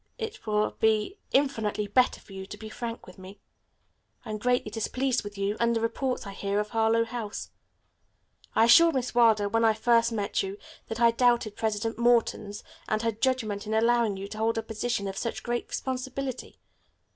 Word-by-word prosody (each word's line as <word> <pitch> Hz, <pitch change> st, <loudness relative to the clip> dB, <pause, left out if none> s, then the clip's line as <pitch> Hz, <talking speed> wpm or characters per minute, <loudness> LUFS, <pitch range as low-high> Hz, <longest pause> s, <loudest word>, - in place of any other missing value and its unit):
It 445 Hz, -, -6 dB
will 210 Hz, 0 st, +1 dB
be 220 Hz, -, +1 dB
infinitely 225 Hz, -7 st, +1 dB
better 250 Hz, +5 st, +2 dB
for 195 Hz, -, -16 dB
you 190 Hz, 0 st, -7 dB
to -, -, -8 dB
be 220 Hz, -, -9 dB
frank 230 Hz, +1 st, -6 dB
with 185 Hz, -, -14 dB
me. 190 Hz, +2 st, -11 dB, 0.9 s
I 220 Hz, -, -5 dB
am 215 Hz, -, -4 dB
greatly 245 Hz, -2 st, 0 dB
displeased 250 Hz, +3 st, -1 dB
with 205 Hz, 0 st, -8 dB
you 200 Hz, +1 st, -1 dB
and 235 Hz, 0 st, +2 dB
the -, -, +1 dB
reports 235 Hz, +3 st, -2 dB
I 200 Hz, -, -6 dB
hear 200 Hz, +1 st, -1 dB
of 210 Hz, 0 st, -2 dB
Harlowe 225 Hz, +1 st, +2 dB
House. 225 Hz, -3 st, -6 dB, 1.0 s
I -, -, +5 dB
assured 330 Hz, +7 st, +7 dB
Miss 255 Hz, -1 st, -1 dB
Wilder, 225 Hz, -4 st, +4 dB
when 225 Hz, +3 st, +1 dB
first 230 Hz, +1 st, +3 dB
I -, -, -3 dB
met 205 Hz, -2 st, -1 dB
you, 195 Hz, +1 st, -5 dB, 0.3 s
that 225 Hz, -, -5 dB
I 235 Hz, -1 st, +6 dB
doubted 235 Hz, -3 st, +2 dB
President 220 Hz, +1 st, -2 dB
Morton's 230 Hz, -3 st, +1 dB, 0.2 s
and 215 Hz, +1 st, -1 dB
her 230 Hz, -, +2 dB
judgment 220 Hz, -3 st, -1 dB
in 220 Hz, -, -1 dB
allowing 230 Hz, -2 st, +2 dB
you 195 Hz, +1 st, -6 dB
to 215 Hz, -, -7 dB
hold 225 Hz, +1 st, +1 dB
a 225 Hz, -, -1 dB
position 220 Hz, -1 st, -2 dB
of 195 Hz, +1 st, -4 dB
such 230 Hz, -, -4 dB
great 240 Hz, 0 st, -2 dB
responsibility. 260 Hz, 0 st, -4 dB
225 Hz, 190 wpm, -27 LUFS, 210-240 Hz, 1.0 s, assured